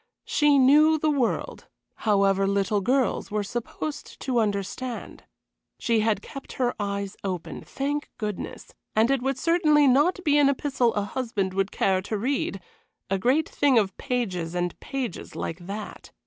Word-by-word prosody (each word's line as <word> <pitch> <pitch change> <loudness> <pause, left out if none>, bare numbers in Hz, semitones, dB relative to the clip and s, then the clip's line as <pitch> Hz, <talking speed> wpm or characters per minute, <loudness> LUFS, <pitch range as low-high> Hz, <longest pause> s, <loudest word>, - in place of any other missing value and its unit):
She 295 -2 +3
knew 300 +4 +6
the 310 0 +1
world, 270 -5 -1 0.3
however 195 -2 +2
little 200 +1 +1
girls 255 +5 +1
were 210 0 -1
supposed 240 +8 -5
to 255 -3 0
understand. 215 +4 -3 0.5
She 230 -2 +1
had 215 -2 +1
kept 275 - -9
her 245 -2 0
eyes 200 -1 -3
open, 185 -4 -4
thank 290 +2 -3
goodness; 210 -3 -5 0.2
and 225 +4 +4
it 275 -2 +1
would 270 +1 -1
certainly 305 -1 +4
not 290 +8 +4
be 295 -1 +4
an 280 -1 +5
epistle 270 -3 +1
a 205 - +1
husband 205 -4 -2
would 195 +1 0
care 190 -1 +1
to 210 +3 -3
read 240 -3 -1 0.5
a 195 - +1
great 265 +9 +2
thing 280 -4 +2
of 195 -4 +2
pages 185 -10 -2
and 175 0 -1
pages 260 -9 -5
like 175 +2 -5
that. 205 +1 -7
235 Hz, 155 wpm, -26 LUFS, 200-275 Hz, 0.5 s, knew